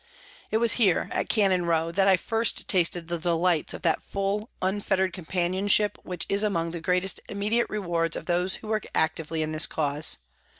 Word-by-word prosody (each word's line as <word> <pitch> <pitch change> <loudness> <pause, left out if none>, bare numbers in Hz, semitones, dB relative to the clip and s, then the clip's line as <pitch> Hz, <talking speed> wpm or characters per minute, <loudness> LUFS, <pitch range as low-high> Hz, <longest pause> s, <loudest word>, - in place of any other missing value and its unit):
It 220 - +1
was 230 0 +4
here, 190 -6 +3
at - - -2
Cannon 190 -5 +2
Row, 165 0 +1
that 195 +3 +2
I 190 -1 +6
first 225 +5 0
tasted 175 -2 +1
the 170 0 -3
delights 170 -1 +1
of - - -10
that - - +1
full, 200 +3 -3
unfetterd 190 -1 0
companionship 190 +4 0
which 180 -2 -5
is 200 +1 0
among 170 -6 0
the 170 -1 -6
greatest 180 +3 +1
immediate 210 +4 0
rewards 170 -5 -1
of - - -6
those 180 +1 +1
who 220 - -10
work 215 -1 -2
actively 160 0 0
in 155 - -3
this 155 0 +1
cause. 150 0 0
180 Hz, 180 wpm, -26 LUFS, 165-200 Hz, -, I